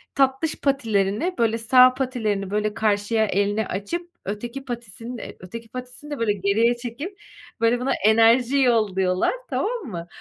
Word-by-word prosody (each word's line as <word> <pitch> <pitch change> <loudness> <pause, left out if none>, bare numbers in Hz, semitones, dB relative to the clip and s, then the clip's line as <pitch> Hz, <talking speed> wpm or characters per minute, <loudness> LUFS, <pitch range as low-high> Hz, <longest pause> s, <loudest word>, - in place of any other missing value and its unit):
tatlış 270 +3 +1
patilerini, 230 - 0
böyle 230 -1 +2
sağ 250 +2 +6
patilerini 220 -7 -2
böyle 210 0 0
karşıya 215 +1 +1
elini 205 +1 0
açıp 340 - -4
öteki 235 +7 -5
patisini 235 0 -7
de - - -9
öteki 225 +5 -9
patisini 255 +5 -9
de 290 - -4
böyle 220 -3 +2
geriye 215 +5 +2
çekip 285 - -7 0.4
böyle 230 +1 +3
buna 255 +2 -1
enerji 230 +4 +5
yolluyorlar, 195 - +2 0.2
tamam 465 -1 -2
mı? 170 -8 -6
230 Hz, 140 wpm, -23 LUFS, 205-255 Hz, 0.4 s, sağ